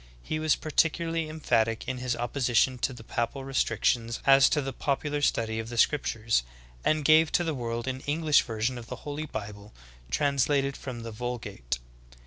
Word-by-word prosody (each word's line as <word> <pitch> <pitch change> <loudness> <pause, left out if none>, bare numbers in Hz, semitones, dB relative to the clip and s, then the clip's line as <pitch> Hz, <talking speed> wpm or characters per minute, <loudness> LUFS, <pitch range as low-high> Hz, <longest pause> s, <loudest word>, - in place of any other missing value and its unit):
He 155 - -2
was 155 -1 +3
particularly 165 +1 0
em 155 +1 -7
phatic 115 -5 +1
in 130 -1 -3
his 125 -1 -1
opposition 125 +1 +1
to 130 - 0
the 120 -3 -10
papal 120 +4 -3
restrictions 115 -2 0
as 135 0 +7
to 150 - +1
the 135 -2 -3
popular 145 +1 -1
study 110 -5 +1
of 115 0 -5
the 120 - -6
scriptures, 115 - +2 0.4
and 155 -1 +1
gave 160 +1 +6
to 175 - +3
the 165 -2 -1
world 120 -2 -3
an 130 0 -2
English 150 0 +4
version 115 +2 -2
of 115 - -11
the 125 - -5
Holy 150 +1 -4
Bible 105 -3 -7 0.3
translated 140 - +1
from 125 -3 -7
the 115 0 -6
Vul 120 +3 -3
gate. 80 - -5
130 Hz, 180 wpm, -28 LUFS, 115-145 Hz, 0.4 s, as